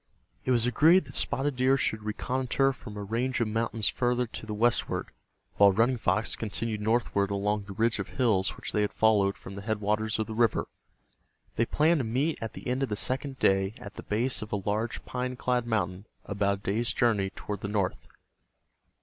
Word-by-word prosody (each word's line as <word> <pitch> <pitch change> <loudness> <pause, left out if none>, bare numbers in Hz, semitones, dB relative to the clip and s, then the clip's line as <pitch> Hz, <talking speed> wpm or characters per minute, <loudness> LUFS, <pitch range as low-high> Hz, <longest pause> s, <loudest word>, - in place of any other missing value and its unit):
It - - -2
was 120 -2 +3
agreed 160 +9 +5
that - - -12
Spotted 140 +1 0
Deer 130 +2 +4
should 110 -4 -1
reconnoiter 130 +5 0
from 105 -4 -10
a 105 - -4
range 120 +6 -1
of 115 - +1
mountains 115 0 0
farther 125 0 +1
to 115 -1 -7
the 105 - -3
westward, 120 +2 0 0.5
while 100 -1 +7
Running 115 +6 +2
Fox 110 -1 +1
continued 110 0 -3
northward 105 -3 +1
along 100 +1 -1
the 100 - -8
ridge 115 +2 +1
of 100 - -4
hills 110 -7 +1
which - - -6
they 105 - +1
had 105 - -1
followed 105 -3 +3
from 95 - -10
the 100 - -7
headwaters 105 0 -1
of 110 - -1
the 110 - -6
river. 115 -1 +1 0.9
They 115 - +1
planned 160 +2 +3
to - - 0
meet 130 +8 0
at 115 - -4
the - - -8
end 125 +2 -1
of 135 - 0
the 105 - -1
second 130 +5 -2
day 95 0 +2
at 100 - -10
the - - -8
base 120 +4 0
of 110 - -7
a - - 0
large 105 +3 -2
pine 125 0 -3
clad 125 -1 0
mountain 95 -3 -2 0.2
about 100 0 0
a - - -19
day's 110 +4 0
journey 110 -6 +2
toward 105 -1 -5
the - - -3
north. 100 -3 -2
110 Hz, 200 wpm, -28 LUFS, 105-125 Hz, 0.9 s, while